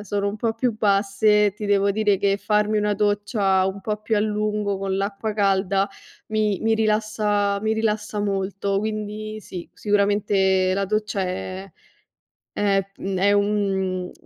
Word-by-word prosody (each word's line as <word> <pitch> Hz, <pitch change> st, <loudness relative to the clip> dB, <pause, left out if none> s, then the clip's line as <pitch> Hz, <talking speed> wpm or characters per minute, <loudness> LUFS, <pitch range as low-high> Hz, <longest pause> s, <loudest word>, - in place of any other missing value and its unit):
sono 200 Hz, 0 st, -1 dB
un 205 Hz, -, -4 dB
po' 225 Hz, +1 st, 0 dB
più 230 Hz, 0 st, -1 dB
basse, 205 Hz, 0 st, +3 dB
ti 210 Hz, -, -7 dB
devo 200 Hz, 0 st, +2 dB
dire 205 Hz, -2 st, +2 dB
che 200 Hz, -1 st, +2 dB
farmi 210 Hz, +1 st, +1 dB
una 210 Hz, 0 st, +1 dB
doccia 205 Hz, -2 st, +1 dB
un 195 Hz, +1 st, -4 dB
po' 210 Hz, +1 st, -3 dB
più 220 Hz, 0 st, 0 dB
a 205 Hz, -, +2 dB
lungo 210 Hz, -1 st, -1 dB
con 195 Hz, -1 st, -2 dB
l'acqua 200 Hz, +2 st, -2 dB
calda 195 Hz, -1 st, +1 dB, 0.4 s
mi 215 Hz, -2 st, 0 dB
mi 225 Hz, 0 st, +2 dB
rilassa 210 Hz, -2 st, +1 dB
mi 220 Hz, -, +1 dB
rilassa 215 Hz, -1 st, -1 dB
molto. 195 Hz, 0 st, -1 dB
Quindi 215 Hz, 0 st, -4 dB
sì, 180 Hz, -3 st, -8 dB
sicuramente 200 Hz, -2 st, +2 dB
la 200 Hz, 0 st, 0 dB
doccia 210 Hz, 0 st, -1 dB
è 185 Hz, +1 st, -5 dB, 0.8 s
è 195 Hz, -2 st, +1 dB
mhmm, 195 Hz, -1 st, -3 dB
è 200 Hz, +2 st, +4 dB
un 195 Hz, -3 st, 0 dB
205 Hz, 150 wpm, -23 LUFS, 195-215 Hz, 0.8 s, è